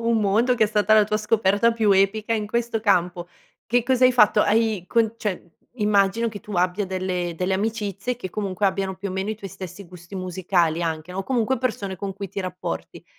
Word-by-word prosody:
un 230 -1 +3
mondo, 220 +5 +2
che 225 -2 +3
è - - +2
stata 210 0 +3
la 215 -1 +6
tua 215 +1 -1
scoperta 210 +1 +2
più 225 -2 +1
epica 200 +3 +2
in 215 -2 -1
questo 235 +1 -1
campo, 180 -4 +1 0.4
che 245 +1 +2
cosa 255 +1 +2
hai 255 - +3
fatto? 210 -3 +5
Hai 215 -3 +2
con 230 -1 +2
cioè, 190 -5 -4 0.2
immagino 210 0 +2
che 210 -2 -8
tu 210 - -10
abbia 185 +2 0
delle 185 -2 -2
delle 185 +2 -1
amicizie 210 +2 -2
che, 190 -6 -7
comunque, 200 0 -3
abbiano 195 0 0
più 195 +1 -5
o - - -5
meno 190 +2 -3
i 215 - -1
tuoi 200 -2 -9
stessi 190 +2 -9
gusti 175 +1 -13
musicali 180 -3 0
anche, 160 +1 -3
no, 185 - -6
o - - -1
comunque 250 +2 0
persone 210 -6 -3
con 195 +1 -5
cui 200 0 -6
ti 195 - -4
rapporti. 185 -1 -6
200 Hz, 215 wpm, -23 LUFS, 185-220 Hz, 0.4 s, la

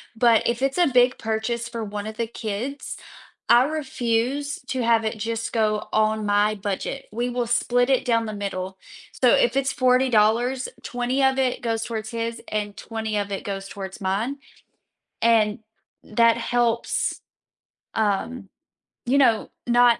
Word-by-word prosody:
but 230 -1 +4
if 235 +1 0
it's 270 +3 0
a 350 - +5
big 250 -1 +4
purchase 230 +2 -2
for 230 -1 -4
1 210 0 -5
of 220 - -7
the 230 - 0
kids, 230 +5 -5 0.5
I 245 +2 +7
refuse 275 -1 -1
to 260 -1 -1
have 230 -1 +3
it 220 0 -2
just 230 +2 -3
go 215 -2 +1
on 215 0 +2
my 205 +1 +2
budget, 205 +7 -4
we 240 +3 -2
will 245 0 -1
split 245 +1 +2
it 265 0 +3
down 230 -2 +2
the 215 - -5
middle, 190 -2 -4 0.4
so - - +6
if - - +2
it's 275 0 +1
$40, 250 -1 +3 0.2
20 245 +2 -1
of 265 0 +3
it 260 -2 0
goes 225 -1 -1
towards 220 -2 -4
his 230 0 -3
and 205 -1 -3
20 220 -1 -4
of 200 0 -2
it 195 - -3
goes 195 -1 -5
towards 190 -1 -8
mine, 205 +9 -1 0.8
and 220 -2 +3 0.4
that 230 +1 +3
helps, 235 0 0 0.7
um, 215 +1 -1 0.6
you 255 +3 +2
know, 235 -6 +3 0.2
not 240 0 +5
230 Hz, 155 wpm, -24 LUFS, 215-250 Hz, 0.8 s, I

